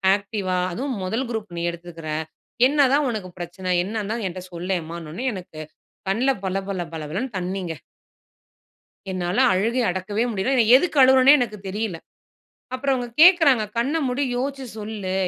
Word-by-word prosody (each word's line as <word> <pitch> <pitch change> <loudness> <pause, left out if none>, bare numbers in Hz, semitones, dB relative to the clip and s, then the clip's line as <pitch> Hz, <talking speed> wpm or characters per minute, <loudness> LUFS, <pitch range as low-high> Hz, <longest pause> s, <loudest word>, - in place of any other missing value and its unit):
ஆக்டிவா, 200 -2 -3
அதுவும் 255 +5 -3
முதல் 225 +8 -2
குரூப் 215 -6 -5
நீ 170 - -2
எடுத்துருக்கிற. 170 -2 -9 0.6
என்னதான் 280 0 +3
உனக்கு 210 -6 -4
பிரச்சனை? 180 +2 -6
என்னன்னு 210 +1 -3
தான் 230 -1 -3
என்ட்ட 185 0 -6
சொல்லேம்மான்னோன்னே 170 +2 -4
எனக்கு 180 -5 -9 0.5
கண்ல 235 +7 +1 0.2
பள 190 0 -1
பள 190 -2 -2
பள 160 - -5
பளனு 210 - -3
தண்ணிங்க. 180 -1 -3 1.4
என்னால 180 +2 -2
அழுகைய 230 +7 +1
அடக்கவே 190 +4 -2
முடியல. 220 +5 0
நான் 230 0 +5
எதுக்கு 325 +3 0
அழுவுறேன்னே 260 +2 +7
எனக்கு 215 -4 -2
தெரியல. 205 -2 -3 0.8
அப்புறம் 270 +1 0
அவங்க 245 -1 -3
கேட்குறாங்க 325 - +7
"கண்ண 270 +7 +1
மூடி 255 +3 0
யோசிச்சு 270 +1 -3
சொல்லு. 210 -3 -4
210 Hz, 140 wpm, -23 LUFS, 185-255 Hz, 1.4 s, அழுவுறேன்னே